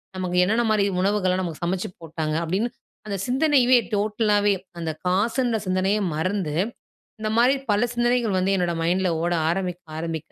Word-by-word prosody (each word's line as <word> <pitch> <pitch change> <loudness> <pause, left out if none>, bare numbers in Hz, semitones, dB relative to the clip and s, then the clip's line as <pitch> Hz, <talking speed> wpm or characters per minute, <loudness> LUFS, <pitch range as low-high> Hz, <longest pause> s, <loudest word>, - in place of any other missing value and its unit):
நமக்கு 180 -1 -2
என்னென்னமாரி 215 0 +2 0.2
உணவுகள்லாம் 190 -2 +1
நமக்கு 170 -3 -5
சமைச்சு 180 +1 -2
போட்டாங்க. 155 -1 -3
அப்பிடின்னு 195 +8 -1 0.4
அந்த 200 -1 -2
சிந்தனையவே 255 -2 +4 0.2
டோட்டலாவே 210 0 +2 0.3
அந்த 165 -1 -2 0.2
காசுன்ற 225 +6 +1
சிந்தனையே 190 +3 +1
மறந்து, 180 -1 -1 0.7
இந்தமாரி 230 +5 +3 0.2
பல 220 +4 +2
சிந்தனைகள் 240 -4 +1
வந்து 195 +2 +1
என்னோட 175 -2 0
மைண்ட்ல 180 +2 +1
ஓட 175 0 +1 0.2
ஆரம்பிக்க 180 0 -2 0.2
ஆரம்பிக்க 160 -1 -5
195 Hz, 135 wpm, -24 LUFS, 180-225 Hz, 0.7 s, சிந்தனையவே